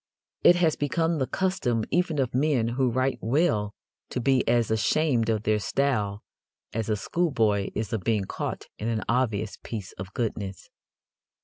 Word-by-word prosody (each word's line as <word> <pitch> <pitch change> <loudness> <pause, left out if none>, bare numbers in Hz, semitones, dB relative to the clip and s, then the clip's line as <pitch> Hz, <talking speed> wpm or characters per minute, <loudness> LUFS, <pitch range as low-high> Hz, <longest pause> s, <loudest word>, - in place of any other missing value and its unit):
It 175 - +8
has 170 -3 +2
become 160 +3 0
the 130 - 0
custom 185 - 0
even 175 -3 +1
of 130 -3 0
men 130 -4 +2
who 125 +1 +1
write 130 +2 0
well 115 -5 +1 0.3
to - - -3
be 130 +1 +3
as 115 -2 +2
ashamed 115 +2 +2
of 110 -2 0
their 110 0 +2
style 105 -2 0 0.5
as 110 0 -2
a 110 - +2
schoolboy 110 - +1
is 110 -1 -3
of 110 - -1
being 110 -1 +1
caught - - -4
in 110 - -3
an 115 -2 -1
obvious 110 -4 0
piece 105 -5 -6
of 90 +1 -6
goodness. 100 -5 -4
115 Hz, 165 wpm, -26 LUFS, 110-140 Hz, 0.5 s, It